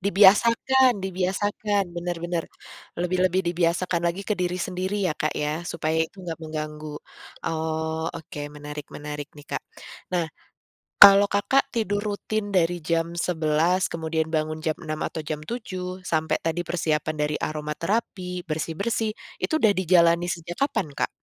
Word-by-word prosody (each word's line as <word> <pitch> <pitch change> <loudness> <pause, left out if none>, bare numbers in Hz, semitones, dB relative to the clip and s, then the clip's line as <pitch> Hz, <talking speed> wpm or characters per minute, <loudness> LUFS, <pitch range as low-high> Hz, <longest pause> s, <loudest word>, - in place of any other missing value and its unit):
dibiasakan 230 +7 +5
dibiasakan 195 +2 0
benar 175 0 -2
benar, 170 -1 -1 0.5
lebih-lebih 180 +1 +2
dibiasakan 170 +1 +1
lagi 190 +4 -4
ke 210 - 0
diri 180 0 0
sendiri 185 +2 -2
ya 180 - +2
Kak 155 - 0
ya 150 +2 -1
supaya 160 0 0
itu 160 +4 -2
enggak 165 -2 -4
mengganggu, 155 -1 -5 0.6
oh 160 0 -1
oke 155 -2 -8 0.2
menarik-menarik 150 0 -7
nih 145 0 -13
Kak - - -2 0.5
nah. 175 -2 +1 0.8
Kalau 200 0 +11
Kakak 205 +7 +1
tidur 215 -3 0 0.2
rutin 205 0 -3
dari 175 -1 +3
jam 165 +1 -1
11 170 +2 +2
kemudian 160 -1 -2
bangun 155 0 -1
jam 155 -1 -1
6 155 0 -3
atau 160 -2 -3
jam 150 -1 -3
7 185 -2 -5
sampai 160 -2 +1
tadi 165 +1 0
persiapan 155 -3 -1
dari 150 0 0
aromaterapi, 180 +4 -2
bersih-bersih 185 +8 -1 0.3
itu - - -1
udah 220 -8 +4
dijalani 175 -2 +4
sejak 175 +2 -5
kapan 190 - 0
Kak? - - 0
170 Hz, 140 wpm, -25 LUFS, 155-190 Hz, 0.8 s, Kalau